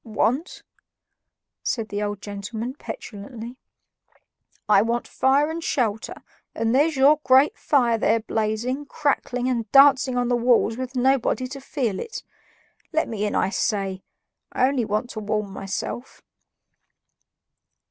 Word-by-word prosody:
"Want?" 230 +7 -1 1.0
said 225 -3 -2
the 205 0 -3
old 205 -1 -3
gentleman 215 +4 -5
petulantly. 235 -1 -8 1.1
"I 205 -2 +6
want 235 +2 -1
fire 280 +4 +2
and 330 +1 -5
shelter, 225 -7 -1 0.4
and 225 +1 0
there's 300 +4 +3
your 285 +3 +5
great 260 +3 +5
fire 240 -6 +2
there 225 +2 +3
blazing, 225 +6 -2
crackling, 260 -5 -1
and 235 -4 -2
dancing 275 -2 +6
on 245 0 +1
the 245 - +2
walls 235 -2 +3
with 255 +1 -6
nobody 255 0 +1
to 275 +1 -8
feel 250 -7 -2
it. 460 - -6 0.7
Let 320 -1 +1
me 210 -2 -2
in, - - -3
I 190 - +1
say; 195 -3 -1 0.5
I 255 - +2
only 265 -4 0
want 215 +4 -2
to 220 - -6
warm 210 -1 -2
myself." 195 +6 -5
240 Hz, 135 wpm, -23 LUFS, 215-265 Hz, 1.1 s, I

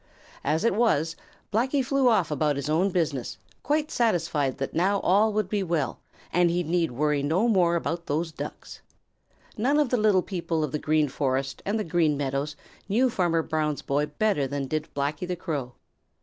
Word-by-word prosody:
As 155 +6 0
it 230 - +3
was, 165 -8 +2 0.4
Blacky 260 +4 +1
flew 275 -1 +3
off 190 -9 +2
about 150 0 +1
his 140 +2 -3
own 175 +5 +3
business, 160 -9 -2 0.2
quite 300 +1 0
satisfied 165 - +1
that 135 - -4
now 195 +4 +2
all 210 +4 +3
would 210 -2 0
be 205 +1 -1
well, 165 -8 -1 0.3
and 175 0 +4
he 175 +1 0
need 165 +1 +1
worry 150 +3 0
no 165 +11 +1
more 180 -6 +3
about 170 0 -2
those 160 +3 -1
Ducks. 155 - -8 0.8
None 265 +7 +2
of 295 -4 +2
the 250 - +2
little 210 -4 +3
people 170 -4 -2
of 150 - -2
the 150 - -2
Green 155 0 +2
Forest 135 0 -2
and 205 +2 +1
the 215 - -1
Green 160 -4 +1
Meadows 140 +1 -2 0.3
knew 245 +5 +3
Farmer 170 -5 +1
Brown's 155 -2 -1
boy 145 +2 0
better 150 -2 0
than 140 0 -3
did 155 +3 -3
Blacky 145 +5 -2
the 180 - -2
Crow. 145 -8 -4
165 Hz, 185 wpm, -26 LUFS, 150-200 Hz, 0.8 s, and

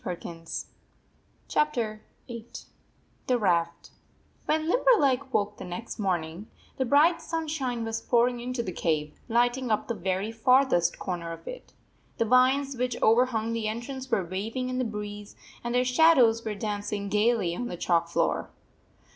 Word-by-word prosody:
VIII 180 - -3 1.3
THE - - -1
RAFT 235 -8 0 0.3
VIII; 235 -2 -9 0.7
THE 250 - +3
RAFT 170 -5 0 0.6
WHEN 315 0 +1
Limberleg 295 - +3
woke 210 -3 0
the - - -8
next 190 +7 -6
morning, 180 0 -2 0.3
the 260 - +1
bright 315 +6 +4
sunshine 300 -8 -2
was 225 0 -3
pouring 240 0 +2
into 245 0 -3
the 185 - -4
cave, 155 -3 -2
lighting 245 +2 +2
up 215 - 0
the 235 - -1
very 190 +1 -2
farthest 230 -6 +3
corner 170 -2 -4
of 165 - -10
it. - - -9 0.4
The 230 - +1
vines 260 +3 +3
which 250 -1 -2
overhung 230 -1 +3
the 225 -2 -2
entrance 255 +4 -5
were 195 -6 +1
waving 220 +8 -3
in 255 0 -2
the - - +1
breeze, 210 -1 -6 0.3
and 240 0 -2
their 250 0 +3
shadows 250 -4 +5
were 215 -2 -3
dancing 205 0 -3
gayly 210 -4 +2
on 245 +6 -3
the 175 - -6
chalk 170 -1 +1
floor. 80 - 0
230 Hz, 155 wpm, -27 LUFS, 200-255 Hz, 1.3 s, shadows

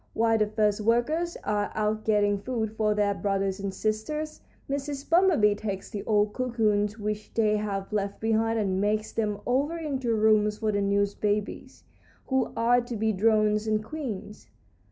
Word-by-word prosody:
While 225 0 +2
the 215 - +2
first 210 0 +1
workers 270 +10 +1
are 205 0 -1
out 215 0 -1
getting 205 -2 +2
food 220 -1 -3
for 215 -1 +1
their 205 -1 +2
brothers 195 -1 -1
and 200 0 -3
sisters, 220 +11 -3 0.3
Mrs. 280 0 -4
Bumblebee 330 - +4
takes 200 -2 -5
the 205 - -4
old 210 -1 +2
cocoons 215 -4 0
which 210 0 -4
they 215 -2 +3
have 200 -1 -4
left 200 -1 -2
behind 225 +1 +1
and 190 -3 0
makes 215 +1 0
them 210 -2 -1
over 280 +7 0
into 265 -7 -1
rooms 210 -1 +3
for 215 -1 0
the 205 -1 0
new 200 0 +2
babies, 210 0 -2 0.4
who 265 -2 0
are 240 +2 +4
to 240 0 -6
be 220 0 +1
drones 215 +1 +2
and 215 0 +1
queens. 220 -6 -6
215 Hz, 165 wpm, -27 LUFS, 205-230 Hz, 0.4 s, Bumblebee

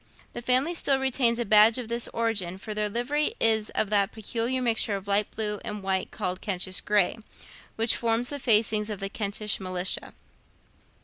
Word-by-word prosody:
The - - -5
family 255 +7 +2
still 280 -5 +2
retains 260 -3 +1
a 240 - -1
badge 215 +3 +6
of 250 -3 -5
this 235 +1 -2
origin; 215 -6 -2
for 215 +3 -7
their 210 0 -1
livery 285 - -1
is 220 -1 +2
of 215 -1 0
that 200 0 +2
peculiar 230 +4 -2
mixture 225 -4 +1
of 195 0 -7
light 200 +1 +2
blue 210 -2 -3
and 210 -1 -5
white 190 -1 -1
called 180 0 -4
Kentish 185 -2 -1
gray, 205 0 +1 0.6
which 225 +1 +2
forms 235 +1 0
the 285 - -4
facings 215 -3 +2
of 210 -3 -5
the 195 - -4
Kentish 210 0 -2
militia. 185 -1 -2
215 Hz, 180 wpm, -27 LUFS, 200-235 Hz, 0.6 s, badge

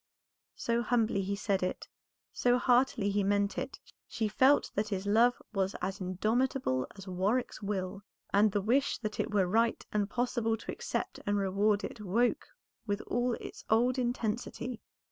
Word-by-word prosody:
So 235 0 0
humbly 225 -3 +1
he 200 +1 -2
said 200 -1 0
it, 185 - -3 0.5
so 245 0 +3
heartily 245 -4 +3
he 205 0 +1
meant 200 0 +1
it, - - -5 0.3
she 220 -2 -1
felt 260 +7 +4
that 205 +1 0
his 195 -2 -3
love 230 +4 +4
was 195 -1 0
as 195 +1 -3
indomitable 215 - 0
as 195 0 -10
Warwick's 195 +9 -1
will, 195 -1 -3 0.3
and 210 +1 +5
the 205 - 0
wish 260 +6 +2
that 215 -2 -5
it - - 0
were 200 -3 +3
right 225 +5 +1
and 205 -1 0
possible 235 -2 0
to - - -6
accept - - -3
and 205 0 +2
reward 200 +2 +2
it 215 - -6
woke 225 +5 +1 0.4
with 205 0 -1
all 245 +1 0
its - - -9
old 245 +4 +3
intensity. 240 0 -2
215 Hz, 165 wpm, -31 LUFS, 200-240 Hz, 0.5 s, and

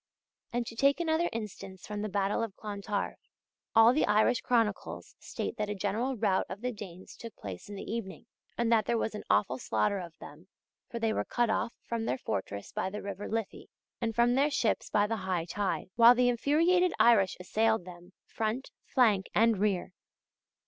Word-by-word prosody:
And 240 0 -1
to 230 - -8
take 275 +6 +3
another 335 0 +1
instance 200 -4 -7
from 210 -1 -5
the 215 - -3
battle 200 +2 0
of 225 -4 -4
Clontarf: 205 -1 -4 0.6
All 225 +2 +7
the 305 - +2
Irish 215 +4 +3
chronicles 230 -4 -1
state - - -5
that 210 -1 -2
a 205 - -2
general 220 +7 -1
rout 200 -3 +1
of 200 - -7
the 250 +1 -1
Danes 190 -5 -10
took 230 -1 -10
place 95 - -8
in 205 - -7
the 195 - -6
evening, 220 -3 -5 0.3
and 235 -1 +1
that 220 -2 +3
there 235 - +2
was 225 - -1
an 210 - -6
awful 105 +6 +2
slaughter 110 - 0
of 170 -3 -9
them, 160 +5 -12 0.4
for 235 - -5
they 225 -1 0
were - - 0
cut 240 -2 0
off 230 +1 -1
from 230 -1 -3
their 130 - 0
fortress 100 -3 -4
by - - -2
the 210 +2 -6
river 200 0 -5
Liffey, 225 -2 -4 0.3
and 225 -2 -1
from 235 +1 +4
their 275 +4 +3
ships 250 -6 0
by 205 -1 +3
the 225 +2 -2
high 185 -4 -2
tide; 195 +1 -2
while 235 +1 +8
the 250 0 +3
infuriated 330 +9 +3
Irish 210 -5 +5
assailed 220 +2 +1
them, 175 0 -12
front, 225 +4 -3
flank, 215 -7 +2
and 225 -2 +4
rear. 195 -3 0
215 Hz, 190 wpm, -30 LUFS, 195-235 Hz, 0.6 s, while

